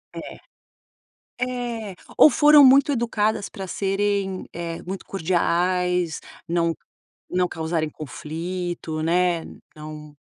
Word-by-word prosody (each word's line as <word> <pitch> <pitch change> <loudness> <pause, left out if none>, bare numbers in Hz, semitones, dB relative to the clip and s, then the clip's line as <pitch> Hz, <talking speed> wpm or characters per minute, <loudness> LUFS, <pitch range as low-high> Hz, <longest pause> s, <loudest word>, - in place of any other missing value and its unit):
É. - - -8 1.1
É, 240 -5 -3 0.2
ou - - +10
foram 295 +1 +7
muito 275 +2 +6
educadas 220 -4 0
pra 195 - -7
serem, 195 0 -1
eh, 170 -1 -5
muito 190 +2 -6
cordiais, 180 -1 0 0.3
não 170 -1 +1 0.6
não 180 0 +2
causarem 160 -1 -2
conflito, 165 +2 -5
né, 175 0 +2 0.3
não 150 -1 -9
180 Hz, 100 wpm, -23 LUFS, 165-205 Hz, 1.1 s, ou